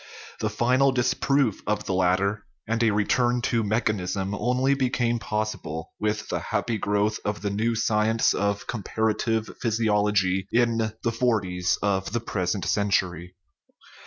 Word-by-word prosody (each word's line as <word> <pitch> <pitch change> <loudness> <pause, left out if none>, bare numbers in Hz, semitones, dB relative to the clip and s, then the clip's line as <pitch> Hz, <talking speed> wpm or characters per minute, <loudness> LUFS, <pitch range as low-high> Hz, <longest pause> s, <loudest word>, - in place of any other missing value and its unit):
The - - 0
final 130 +3 +3
disproof 130 -1 +1
of 105 0 -1
the 95 - -2
latter 95 +3 +1 0.2
and 115 +1 0
a 115 - +4
return 120 +4 +2
to 115 0 +1
mechanism 100 -3 -1
only 125 +6 +1
became 125 -3 0
possible 105 -8 -4
with 105 0 -1
the - - -2
happy 115 -2 -2
growth 105 +2 0
of 105 -1 -3
the 100 - -1
new 115 +3 0
science 110 0 +2
of 100 0 -1
comparative 110 0 -1
physiology 105 -4 +1
in 115 -2 +2
the 115 - +1
forties 100 -7 0
of 95 0 0
the 120 - +1
present 100 -3 -2
century. 90 -3 0
105 Hz, 135 wpm, -25 LUFS, 100-115 Hz, 0.2 s, a